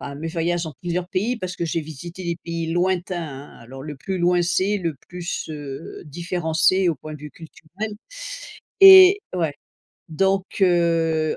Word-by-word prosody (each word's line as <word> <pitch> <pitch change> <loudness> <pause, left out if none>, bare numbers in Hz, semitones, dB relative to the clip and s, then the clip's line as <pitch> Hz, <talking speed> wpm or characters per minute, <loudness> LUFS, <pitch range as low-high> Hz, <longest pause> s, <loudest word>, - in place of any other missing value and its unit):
à 140 0 -7
mes 160 +3 -5
voyages 170 +1 -1
dans 155 - -7
plusieurs 175 +1 -2
pays, 215 +6 -1
parce 185 -3 -5
que 170 - -2
j'ai 165 +1 -1
visité 165 +4 -9
des 170 -1 -2
pays 165 -1 -3
lointains, 175 0 0
hein. 140 -1 -10
Alors 130 +3 -10
le 150 0 -7
plus 190 +7 -4
loin 175 0 +3
c'est, 185 +4 +1
le 170 -5 -2
plus, 180 -1 -5
heu, 145 -1 -7
différent, 170 +2 -4
c'est 180 +3 +4
au - - -2
point 155 +3 -9
de 150 - -11
vue 150 0 -8
culturel 165 +7 -8 0.9
et 380 0 +10 0.2
ouais, 165 -5 -1 0.5
donc, 195 +4 +1 0.2
heu, 165 -3 +2
170 Hz, 175 wpm, -22 LUFS, 155-185 Hz, 0.9 s, et